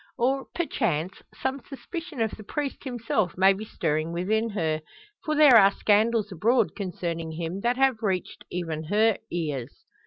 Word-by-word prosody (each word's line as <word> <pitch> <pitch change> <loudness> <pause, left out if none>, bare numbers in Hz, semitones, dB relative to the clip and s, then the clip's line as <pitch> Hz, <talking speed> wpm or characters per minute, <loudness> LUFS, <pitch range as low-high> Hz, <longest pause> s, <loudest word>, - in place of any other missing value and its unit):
Or, 265 +3 +1
perchance, 190 - -1 0.2
some 265 +1 -2
suspicion 295 +1 -6
of 220 -1 +1
the 215 - -9
priest 285 +5 -4
himself 225 -7 -1
may 190 +1 +6
be 200 +3 -6
stirring 155 -4 -1
within 215 +7 0
her: 160 -7 -1 0.4
for 310 - -1
there 295 -4 +7
are 195 -2 +8
scandals 215 +1 +2
abroad 230 +8 +2
concerning 170 -4 -4
him, 165 +3 -4
that 240 +2 +1
have 265 -4 +2
reached 190 -4 -2
even 165 -3 -4
her 215 +5 +2
ears. 150 -8 -4
210 Hz, 155 wpm, -26 LUFS, 170-245 Hz, 0.4 s, are